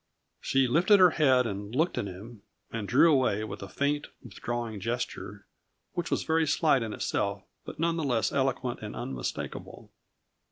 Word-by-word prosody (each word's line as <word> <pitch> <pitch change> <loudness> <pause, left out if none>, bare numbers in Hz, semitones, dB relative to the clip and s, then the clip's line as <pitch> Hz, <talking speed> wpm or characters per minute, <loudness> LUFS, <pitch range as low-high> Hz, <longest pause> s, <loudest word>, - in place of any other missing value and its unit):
She 135 -1 +2
lifted 180 - +5
her 180 -2 +7
head 130 -6 +3
and 100 +1 -5
looked 160 +5 +1
at 100 - -2
him, 100 +4 -10 0.3
and 110 -3 -4
drew 145 +8 +5
away 125 -6 +2
with 110 - -6
a 100 - -7
faint, 145 +1 -1 0.2
withdrawing 120 -1 -5
gesture, 120 +5 -4 0.5
which 175 -1 -3
was - - 0
very 160 0 +1
slight 150 -3 +3
in 115 -1 -3
itself 100 -1 -2 0.2
but - - -8
none 165 +1 +1
the 160 - -1
less 120 -6 +1
eloquent 130 -2 -1
and - - -6
unmistakable. 65 0 -6
125 Hz, 165 wpm, -28 LUFS, 105-150 Hz, 0.5 s, her